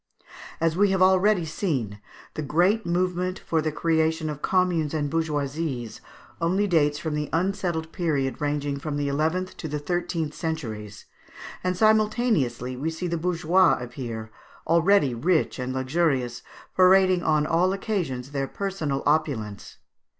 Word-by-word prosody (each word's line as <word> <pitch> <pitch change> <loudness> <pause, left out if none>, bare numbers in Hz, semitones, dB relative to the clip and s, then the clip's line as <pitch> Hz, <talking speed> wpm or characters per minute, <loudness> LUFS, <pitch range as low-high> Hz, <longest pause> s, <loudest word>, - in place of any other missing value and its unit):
As 165 0 +1
we 200 +2 +4
have 190 -1 +1
already 190 0 +4
seen, 135 - -2 0.3
the - - -4
great 175 +10 +2
movement 180 +1 0
for 160 -1 -1
the 155 0 -1
creation 160 0 0
of 150 -1 -8
communes 175 -5 +1
and 145 -2 -1
bourgeoisies 145 -6 -2 0.4
only 185 +5 +2
dates 150 -6 +2
from 155 0 -3
the 150 0 -2
unsettled 175 -2 -1
period 145 -7 -1
ranging 145 -1 -1
from 145 0 -4
the 145 -1 -1
eleventh 160 +6 -1
to 160 - -5
the 150 0 -3
thirteenth 165 0 -2
centuries, 110 - -5 0.6
and 180 0 -1
simultaneously 215 - +2
we 145 +6 -2
see 160 +2 -5
the 170 -1 -1
bourgeois 175 +1 +3
appear, 120 -3 -6 0.3
already 170 -3 +3
rich 155 +5 +1
and 125 0 -3
luxurious, 130 -2 0 0.3
parading 185 -1 +5
on 155 -2 +2
all 175 +4 +2
occasions 175 - -3
their 135 -1 -2
personal 160 -7 -3
opulence. 140 -10 -1
160 Hz, 140 wpm, -25 LUFS, 140-180 Hz, 0.6 s, parading